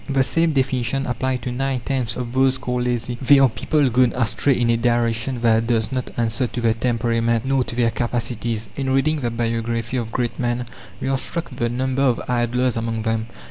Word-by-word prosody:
The 135 -1 +3
same 165 +4 +2
definition 130 0 0
applies 125 +1 -1
to 125 - -4
nine 135 0 -1
tenths 125 -2 -1
of 125 -1 -5
those 130 0 +3
called 125 -1 -2
lazy. 120 0 -2
They 140 +2 +6
are 135 -1 +6
people 145 +4 +1
gone 125 0 +3
astray 125 +3 +1
in 120 -1 +2
a - - +3
direction 120 +1 0
that 115 -1 +3
does 115 -1 +1
not 130 -1 -2
answer 120 +2 0
to 120 - -5
their 115 -2 +2
temperament 115 0 0
nor 135 -1 +2
to - - -6
their 120 -1 +2
capacities. 115 -2 -2
In 135 -1 -2
reading 140 +4 +2
the 120 -4 -1
biography 115 +1 -2
of 115 -2 -3
great 120 -1 -2
men, 120 0 -1 0.3
we - - -3
are 135 0 +1
struck 170 +1 -3
with 125 - -10
the 120 - +1
number 130 +2 -1
of 130 -4 +3
"idlers" 125 0 +1
among 115 -1 -2
them. 110 0 -1
120 Hz, 210 wpm, -21 LUFS, 115-130 Hz, 0.3 s, They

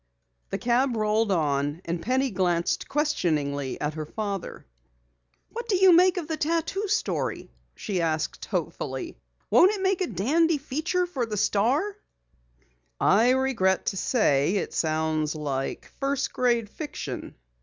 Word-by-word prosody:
The - - -2
cab 245 +1 +1
rolled 215 0 +1
on, 145 -1 0
and 170 0 -3
Penny 260 +4 0
glanced 175 -3 0
questioningly 150 - -1
at 150 +1 -2
her 155 -1 -5
father. 200 -1 -5 0.8
"What 470 +1 -7
do 405 - +3
you 370 -2 +6
think 365 +1 +5
of 335 -4 -3
the 320 -1 -2
tattoo 335 +6 -1
story?" 430 +3 -2 0.2
she 190 -4 -2
asked 160 -1 -2
hopefully. - - -4 0.3
"Won't 380 +4 +6
it 405 - -4
make 380 -1 +1
a 370 - +1
dandy 300 - +2
feature 310 +6 -1
for 270 -10 -3
the 210 -1 -4
Star?" 245 - +1 1.0
"I 225 +5 +4
regret 255 -8 +2
to 195 - -1
say 170 - +2
it 195 - -2
sounds 155 -1 0
like 140 -3 -4
first 275 0 -1
grade 240 -3 +1
fiction." 295 +7 -6
225 Hz, 140 wpm, -26 LUFS, -, 1.0 s, you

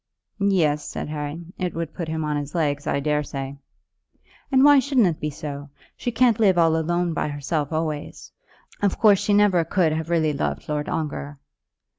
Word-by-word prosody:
"Yes," 165 -7 +2
said - - -5
Harry, 150 +2 -5 0.2
"it 180 -2 -2
would 165 -2 -4
put 170 - -5
him 160 0 -2
on 150 0 -1
his 145 +2 -4
legs, 145 -3 -1
I - - +1
daresay." 140 -2 -2 1.0
"And 265 0 +5
why 290 -1 +8
shouldn't 265 -4 +3
it 170 -4 0
be 150 - -2
so? 145 -1 -7 0.3
She 245 - -3
can't 235 -1 +3
live 195 -5 +4
alone 165 +1 +2
by - - -1
herself 145 +1 -2
always. 155 -2 -4 0.5
Of 200 -2 +1
course 205 -4 +5
she 205 0 0
never 200 -4 +4
could 165 0 +1
have 160 +1 -3
really 160 -3 +2
loved 140 - -3
Lord 150 -1 -2
Ongar." 145 -2 -4
160 Hz, 175 wpm, -23 LUFS, 150-185 Hz, 1.0 s, why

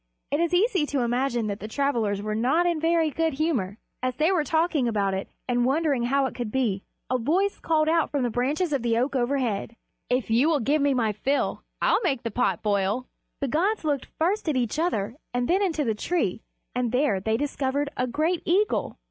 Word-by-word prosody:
It 290 - +1
is 340 -1 +1
easy 370 -3 +2
to 280 -3 0
imagine 240 -1 0
that 205 -1 -3
the 215 - -6
travelers 220 -6 0
were 215 0 -2
not 260 +11 +2
in 340 -2 +1
very 325 -1 +2
good 325 +1 0
humor. 265 - -1 0.2
As 255 0 -1
they 310 +6 +2
were 350 -5 +2
talking 315 -4 +1
about 200 -4 0
it, 190 +1 -3 0.2
and 245 -1 +1
wondering 275 -1 +1
how 275 +2 +2
it 260 - -3
could 240 -4 -4
be, 220 -7 0 0.3
a 255 - +2
voice 365 - +1
called 310 -2 +1
out 325 0 +2
from 285 -3 -1
the 240 - 0
branches 290 +8 0
of 275 - +1
the 230 -1 +1
oak 260 +4 0
overhead, 240 -4 -1 0.3
"If 250 -2 0
you 250 +8 +4
will 310 -3 +2
give 285 +5 +1
me 280 -1 +2
my 225 -4 +1
fill, 270 +7 -1 0.2
I'll - - +3
make 275 -9 0
the 230 - -3
pot 200 -6 0
boil." 205 +4 0 0.4
The 275 - 0
gods 360 - +1
looked 290 -4 -1
first 360 +2 +1
at 290 - +1
each 245 +3 -1
other 230 - -1 0.2
and 245 0 0
then 375 +3 +2
into 325 -6 +1
the 225 -5 +1
tree, 220 - -1 0.3
and 245 -2 -1
there 250 -6 +2
they 220 +3 0
discovered 280 +1 -1
a 255 - 0
great 315 +7 0
eagle. 395 +5 +1
270 Hz, 215 wpm, -26 LUFS, 235-315 Hz, 0.4 s, you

